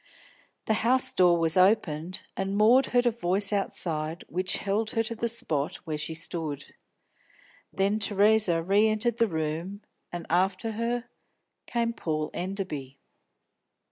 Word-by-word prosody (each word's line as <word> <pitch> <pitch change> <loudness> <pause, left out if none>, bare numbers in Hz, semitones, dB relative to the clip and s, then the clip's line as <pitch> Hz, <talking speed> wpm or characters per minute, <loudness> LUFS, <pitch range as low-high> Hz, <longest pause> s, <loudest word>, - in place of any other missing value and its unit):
The 220 - +1
house 260 +2 +3
door 175 -2 +4
was 165 -1 0
opened, 185 -3 +1
and 195 +1 -2
Maud 240 +6 +5
heard 245 0 +2
a 240 - +4
voice 200 -1 0
outside 165 -4 -2
which 185 +1 -1
held 210 +2 -1
her 225 - +3
to 230 - -4
the 230 +1 -2
spot 160 - -1
where 155 -2 -3
she 160 +1 -3
stood. 155 -4 -3 1.0
Then 200 +3 0
Theresa 205 -4 +3
re 200 +5 +3
entered 220 +2 0
the 230 - +4
room, 165 +4 -4 0.3
and 175 -1 -6
after 190 +5 0
her 235 +2 -2 0.6
came 235 -1 -1
Paul 155 -7 -3
Enderby. 175 -8 -5
195 Hz, 140 wpm, -27 LUFS, 165-220 Hz, 1.0 s, Maud